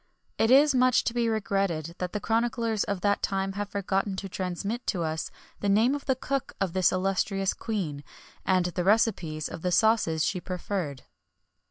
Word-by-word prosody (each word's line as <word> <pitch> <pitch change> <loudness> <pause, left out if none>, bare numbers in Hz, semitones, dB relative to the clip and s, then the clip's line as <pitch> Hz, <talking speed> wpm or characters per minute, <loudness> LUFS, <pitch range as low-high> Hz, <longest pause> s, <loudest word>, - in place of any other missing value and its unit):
[XXI - - -44
5] - - -42
It 265 +3 +8
is 295 -1 +2
much 255 -1 +4
to 230 - -1
be 235 -1 +1
regretted 195 -7 -1
that 180 -1 -3
the 210 - -2
chroniclers 230 0 0
of 200 -3 -3
that 205 0 +1
time 195 0 -1
have 205 +1 -4
forgotten 195 0 -1
to 195 +1 -5
transmit 190 +5 -4
to 175 -5 0
us 160 0 -2 0.3
the 205 - -1
name 220 +6 +4
of 285 -1 -4
the 265 - +3
cook 275 +1 -3
of 190 -3 -1
this 185 -1 +3
illustrious 195 +1 0
Queen, 170 -11 -4 0.4
and 185 -2 +2
the 180 0 -2
recipes 185 -7 +1
of 165 - -8
the 180 - -1
sauces 175 -5 +3
she 180 - -1
preferred. 180 -6 -4
195 Hz, 190 wpm, -27 LUFS, 180-225 Hz, 0.4 s, It